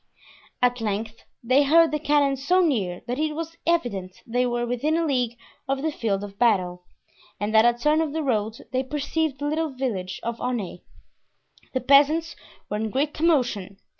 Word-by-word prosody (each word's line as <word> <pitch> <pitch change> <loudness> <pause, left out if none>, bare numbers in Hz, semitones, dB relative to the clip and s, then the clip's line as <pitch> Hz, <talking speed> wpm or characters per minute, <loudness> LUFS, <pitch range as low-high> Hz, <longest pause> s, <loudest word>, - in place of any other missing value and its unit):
At 245 -1 +2
length 220 +1 -3 0.2
they 255 +4 +4
heard 325 +3 +5
the 300 - -1
cannon 290 -2 +2
so 355 +8 +2
near 200 - -1
that 245 +3 -3
it 310 -1 -1
was 330 +1 -6
evident 200 - -1
they 245 +2 0
were 240 0 -1
within 255 +7 0
a 335 - +1
league 250 -5 0 0.3
of 270 +1 -1
the 315 - 0
field 205 -7 -1
of 200 -1 -9
battle, 180 -6 +1 0.5
and 210 +2 -2
at 220 +1 +7
a 240 0 +4
turn 300 +5 +2
of 315 -3 -1
the 320 +1 -2
road 220 -4 -1
they 255 - +1
perceived 295 +2 -2
the 290 - -4
little 315 +2 0
village 225 -9 -3
of 235 0 -4
Aunay. 230 -8 -3 0.9
The 260 - 0
peasants 295 +5 +4 0.3
were 210 - -3
in 220 +1 -2
great 285 +6 0
commotion. 245 - 0
255 Hz, 180 wpm, -24 LUFS, 220-300 Hz, 0.9 s, at